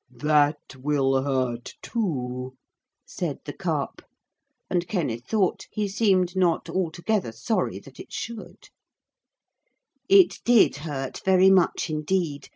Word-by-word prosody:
'That 145 +3 +1
will 135 -1 +1
hurt 130 -3 -2
too,' 130 - -3 0.5
said - - -4
the - - -6
Carp, - - -3 0.7
and 175 -1 -1
Kenneth 140 - -2
thought 200 -5 0
he 210 -2 -2
seemed 190 -3 +2
not 180 -3 +1
altogether 180 - -1
sorry 115 - -1
that - - -14
it - - -10
should. 230 -2 -7 1.4
It 390 -2 +6
did 235 -10 +5
hurt 140 -3 -5
very 190 0 +5
much 185 -3 +3
indeed. 155 -1 -2
160 Hz, 115 wpm, -25 LUFS, 135-190 Hz, 1.4 s, It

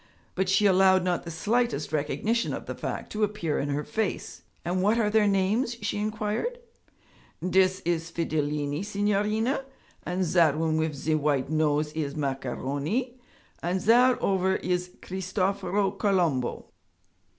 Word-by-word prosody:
But 190 0 0
she 195 +2 +3
allowed 190 -1 +5
not 180 -1 -1
the - - -5
slightest 205 - 0
recognition 210 +10 0
of - - -7
the - - -4
fact - - -5
to 215 0 -1
appear 200 -7 -1
in 145 - -2
her 145 +1 -1
face. 220 +2 -3 0.2
'And 180 +2 0
what 210 +4 +3
are 210 -3 +2
their 215 -1 +4
names?' 210 +5 +1
she - - -1
inquired. 215 - -2 0.9
'Dis 185 0 +3
is 170 -1 -1
Fidilini, 150 -2 -1
signorina, 210 +5 0 0.4
and 180 +1 -1
zat 165 -3 +3
one 160 0 +1
wif 160 -1 0
ze 145 +3 -1
white 145 -2 +1
nose 150 -1 +1
is 145 -3 -3
Macaroni, 145 - -2 0.4
and 180 +2 0
zat 245 +5 +5
ovver 190 -1 +2
is 180 0 -1
Cristoforo 190 +1 -1
Colombo.' 180 - 0
185 Hz, 140 wpm, -27 LUFS, 155-210 Hz, 0.9 s, allowed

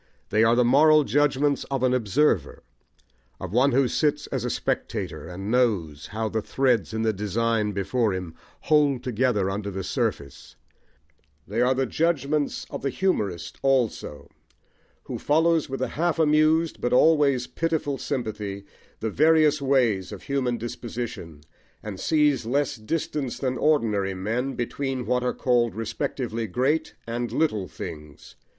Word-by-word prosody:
They 110 +2 +3
are 115 +1 +4
the 125 0 +3
moral 150 +4 +6
judgments 145 0 +1
of 135 -2 -3
an 130 -1 +3
observer, 115 - +1 0.8
of 95 0 -6
one 130 +4 +4
who 130 +1 +3
sits 150 +2 0
as - - -3
a - - -1
spectator, - - -3
and 95 +4 -5
knows 95 - 0
how 110 +1 -3
the 110 +1 -2
threads 125 -4 +1
in 110 0 -2
the 110 -1 +1
design 105 +2 0
before 100 +3 0
him 90 -3 -5 0.3
hold 145 -4 +2
together 120 -5 +1
under 100 +1 -3
the 95 -1 -5
surface: 95 - -3 0.9
they 110 +4 -1
are 125 +1 +3
the 135 +1 +1
judgments 150 0 0
of - - -5
the 140 - -1
humourist 105 - -2
also, 120 - 0 0.8
who - - -6
follows 160 +1 +2
with 135 -1 -3
a - - -2
half 170 +1 -1
amused 155 +1 +2
but 120 - 0
always 140 -3 +4
pitiful 160 -4 -2
sympathy, 105 -6 -4 0.4
the 110 - -2
various 155 +1 +4
ways 120 -9 +1
of 100 - -9
human 130 -3 -1
disposition, 115 -9 -6 0.4
and 100 -3 -6
sees 150 -4 +2
less 135 +4 0
distance 135 +2 -3
than 130 -2 -1
ordinary 105 -11 +1
men 115 +8 -2
between 130 +1 -3
what 125 0 +1
are 125 - +1
called 120 -2 +1
respectively 115 0 -3
great 140 - 0
and 120 +1 -3
little 110 - 0
things. 75 -4 -9
125 Hz, 145 wpm, -25 LUFS, 105-145 Hz, 0.9 s, moral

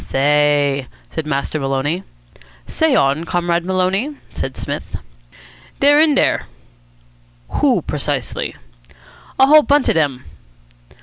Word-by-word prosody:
"Say!" 145 +2 +1 0.2
said 160 -2 -4
Master 140 +1 -2
Maloney. 135 +5 -1 0.6
"Say 320 -4 +1
on, 140 - +2
Comrade 175 0 -1
Maloney," 190 - -1 0.2
said 130 - -5
Psmith. - - -5 0.8
"Dey're 290 +1 +5
in 310 -2 +4
dere." - - +1 1.1
"Who, - - +2
precisely?" - - -3 0.8
"A 265 - +6
whole 305 +2 +7
bunch 290 -1 +2
of - - +3
dem." 140 -5 -1
165 Hz, 110 wpm, -18 LUFS, -, 1.1 s, whole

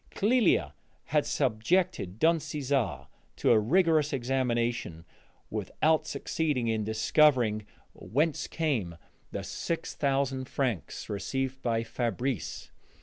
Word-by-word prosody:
Clélia 205 - +3 0.3
had 150 0 +1
subjected 130 - 0
Don 165 +5 +4
Cesare 145 -4 -1 0.3
to - - +2
a 115 - +6
rigorous 155 - +3
examination, 120 - -1 0.5
without 150 - +1
succeeding 150 -7 -1
in 110 -1 0
discovering 110 0 +3 0.3
whence 150 +5 -1
came 120 - -1 0.3
the - - -4
six 170 - -3
thousand 135 -2 0
francs 120 - -2
received 135 +6 -3
by 115 -2 0
Fabrice. 120 - -3
130 Hz, 100 wpm, -29 LUFS, 110-150 Hz, 0.5 s, a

